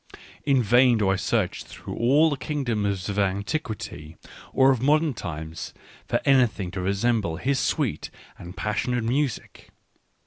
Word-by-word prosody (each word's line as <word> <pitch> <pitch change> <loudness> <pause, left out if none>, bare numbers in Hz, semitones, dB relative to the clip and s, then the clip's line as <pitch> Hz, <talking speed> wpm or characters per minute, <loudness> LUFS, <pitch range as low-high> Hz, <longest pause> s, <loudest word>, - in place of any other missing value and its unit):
In 135 -3 +3
vain 120 +2 +5
do 100 -3 +1
I 95 - +3
search - - -1
through - - -9
all 145 +7 +4
the - - 0
kingdoms 110 - -2
of 100 0 -2
an 100 0 +1
tiquity 105 - -5 0.4
or 135 0 +5
of 130 -3 0
modern 150 +2 +3
times 80 -5 -7 0.3
for - - +1
anything 120 -9 +2
to 90 0 -4
resemble 100 -1 0
his 135 +10 0
sweet - - -1 0.3
and 90 +2 -10
passionate 120 +3 -1
music. 130 +1 -2
115 Hz, 145 wpm, -25 LUFS, 95-135 Hz, 0.4 s, vain